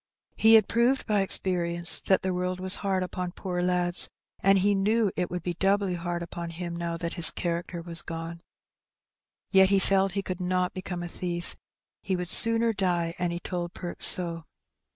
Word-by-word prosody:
He 225 Hz, +1 st, +5 dB
had 215 Hz, -3 st, +5 dB
proved 245 Hz, +3 st, +1 dB
by 210 Hz, -2 st, +1 dB
experience 175 Hz, -2 st, +1 dB
that 190 Hz, -1 st, +2 dB
the 185 Hz, -1 st, -1 dB
world 180 Hz, 0 st, -3 dB
was 185 Hz, 0 st, +3 dB
hard 190 Hz, -2 st, -1 dB
upon 180 Hz, -1 st, -5 dB
poor 180 Hz, -3 st, -4 dB
lads, 180 Hz, 0 st, 0 dB, 0.3 s
and 195 Hz, +1 st, +3 dB
he 200 Hz, +2 st, +2 dB
knew 210 Hz, +1 st, +1 dB
it 180 Hz, -, -2 dB
would 180 Hz, -2 st, -5 dB
be 175 Hz, -, -3 dB
doubly 195 Hz, +1 st, 0 dB
hard 175 Hz, 0 st, -4 dB
upon 170 Hz, 0 st, -7 dB
him 170 Hz, +1 st, -6 dB
now 170 Hz, 0 st, -4 dB
that 170 Hz, 0 st, -5 dB
his 170 Hz, -3 st, +2 dB
character 170 Hz, 0 st, -4 dB
was 170 Hz, -1 st, -2 dB
gone. 165 Hz, 0 st, -7 dB, 1.1 s
Yet 190 Hz, -1 st, +5 dB
he 200 Hz, -, +3 dB
felt 195 Hz, -1 st, +1 dB
he 195 Hz, 0 st, -2 dB
could 185 Hz, -1 st, -6 dB
not 180 Hz, 0 st, -1 dB
become 180 Hz, -2 st, -6 dB
a -, -, -5 dB
thief. 175 Hz, 0 st, -6 dB, 0.5 s
He 190 Hz, -, -2 dB
would 180 Hz, -1 st, -5 dB
sooner 230 Hz, +2 st, +2 dB
die, 175 Hz, -4 st, -1 dB
and 175 Hz, -1 st, -1 dB
he 170 Hz, -, -4 dB
told 175 Hz, -1 st, -5 dB
Perks 175 Hz, -, +4 dB
so. 170 Hz, -2 st, +6 dB
180 Hz, 190 wpm, -26 LUFS, 170-195 Hz, 1.1 s, so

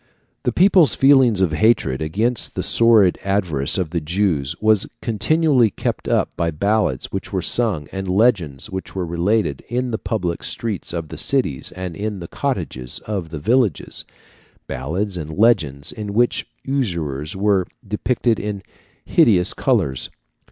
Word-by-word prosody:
The -, -, +2 dB
people's 185 Hz, -4 st, +5 dB
feelings 130 Hz, -7 st, +5 dB
of 90 Hz, -4 st, +2 dB
hatred 75 Hz, -, +2 dB
against 110 Hz, +10 st, -1 dB
the -, -, -2 dB
sordid 110 Hz, -6 st, +4 dB
avarice 90 Hz, -9 st, 0 dB
of 90 Hz, -5 st, -2 dB
the 85 Hz, -1 st, -1 dB
Jews 80 Hz, -4 st, -1 dB
was 110 Hz, -2 st, +3 dB
continually 125 Hz, +2 st, +2 dB
kept -, -, -4 dB
up -, -, 0 dB
by 85 Hz, -, 0 dB
ballads 100 Hz, -3 st, 0 dB
which -, -, -5 dB
were -, -, -1 dB
sung, 100 Hz, -12 st, 0 dB
and 95 Hz, 0 st, -5 dB
legends 90 Hz, -, +1 dB
which 95 Hz, 0 st, -6 dB
were 95 Hz, -2 st, -2 dB
related, 85 Hz, -1 st, 0 dB
in 125 Hz, +1 st, -1 dB
the 110 Hz, -, -2 dB
public 90 Hz, -7 st, -2 dB
streets 110 Hz, -6 st, -4 dB
of 85 Hz, -2 st, -5 dB
the 80 Hz, -, -7 dB
cities 120 Hz, -, -1 dB
and 90 Hz, -2 st, -6 dB
in 105 Hz, 0 st, -4 dB
the 85 Hz, -, -7 dB
cottages 65 Hz, -5 st, -4 dB
of 100 Hz, -6 st, -4 dB
the 80 Hz, -, -6 dB
villages 110 Hz, -, 0 dB, 0.6 s
ballads 90 Hz, +9 st, -3 dB
and 80 Hz, 0 st, -6 dB
legends 85 Hz, -, +2 dB
in 105 Hz, -2 st, -6 dB
which 120 Hz, +1 st, +1 dB, 0.2 s
usurers 85 Hz, -, -2 dB
were 95 Hz, -2 st, +1 dB, 0.2 s
depicted 115 Hz, +2 st, 0 dB
in 105 Hz, -2 st, -4 dB, 0.4 s
hideous 90 Hz, -6 st, +4 dB
colours 65 Hz, -2 st, 0 dB
(Fig. -, -, -31 dB
95 Hz, 150 wpm, -20 LUFS, 80-110 Hz, 0.6 s, people's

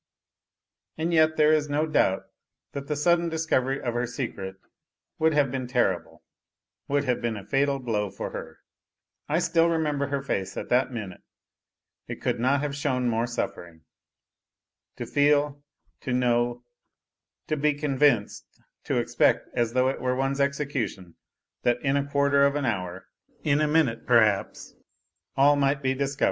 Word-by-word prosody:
And 165 Hz, +2 st, -1 dB
yet 155 Hz, -1 st, +4 dB
there 155 Hz, 0 st, +5 dB
is 150 Hz, -1 st, +1 dB
no 150 Hz, +2 st, +1 dB
doubt 120 Hz, -11 st, +1 dB, 0.5 s
thai -, -, -3 dB
the 140 Hz, +2 st, -4 dB
sudden 170 Hz, +3 st, +2 dB
discovery 140 Hz, -5 st, 0 dB
of 120 Hz, -, -3 dB
her 120 Hz, +1 st, -1 dB
secret 115 Hz, -7 st, -5 dB, 0.6 s
would 160 Hz, 0 st, +3 dB
have 140 Hz, -3 st, +2 dB
been 130 Hz, -1 st, -3 dB
terrible 120 Hz, -8 st, -1 dB, 0.6 s
would 140 Hz, 0 st, +1 dB
have 125 Hz, -3 st, -1 dB
been 115 Hz, -2 st, -2 dB
a 100 Hz, -, -9 dB
fatal 140 Hz, 0 st, +1 dB
blow 110 Hz, -6 st, -2 dB
for 100 Hz, -, -6 dB
her. 80 Hz, 0 st, -8 dB, 0.7 s
I 155 Hz, -, +2 dB
still 170 Hz, -1 st, +2 dB
remember 150 Hz, -4 st, 0 dB
her 140 Hz, -1 st, -2 dB
face 95 Hz, -8 st, -3 dB
at -, -, -5 dB
that 130 Hz, +2 st, +2 dB
minute, 105 Hz, -6 st, -7 dB, 0.9 s
it -, -, -6 dB
could -, -, -1 dB
not 135 Hz, +4 st, +2 dB
have 145 Hz, -1 st, -3 dB
shown 130 Hz, -4 st, 0 dB
more 115 Hz, +1 st, 0 dB
suffering. 85 Hz, -8 st, -5 dB, 1.2 s
To -, -, -4 dB
feel, 145 Hz, 0 st, +2 dB, 0.4 s
to 130 Hz, -, -3 dB
know, 120 Hz, -1 st, +1 dB, 0.8 s
to 155 Hz, -, -1 dB
l)e 150 Hz, 0 st, +1 dB
convinced, 140 Hz, -6 st, +1 dB, 0.4 s
to -, -, 0 dB
expect, -, -, +1 dB
as 120 Hz, -1 st, 0 dB
though 130 Hz, 0 st, +3 dB
it 135 Hz, -, -4 dB
were 125 Hz, 0 st, 0 dB
one's 135 Hz, +1 st, 0 dB
execution, 140 Hz, -, -2 dB, 0.5 s
that 120 Hz, 0 st, +1 dB
in 135 Hz, 0 st, +1 dB
a 140 Hz, 0 st, -1 dB
quarter 140 Hz, 0 st, +3 dB
of 140 Hz, -, -2 dB
an 145 Hz, -2 st, -1 dB
hour, 95 Hz, -6 st, -3 dB, 0.4 s
in 150 Hz, 0 st, +2 dB
a 155 Hz, -, +2 dB
minute 150 Hz, -9 st, +1 dB
perhaps, 110 Hz, -5 st, +2 dB, 0.6 s
all 145 Hz, +2 st, +5 dB
might 140 Hz, 0 st, +1 dB
be 130 Hz, 0 st, +2 dB
di 140 Hz, +1 st, -1 dB
i -, -, -2 dB
ov. 140 Hz, 0 st, -7 dB
135 Hz, 165 wpm, -26 LUFS, 120-145 Hz, 1.2 s, there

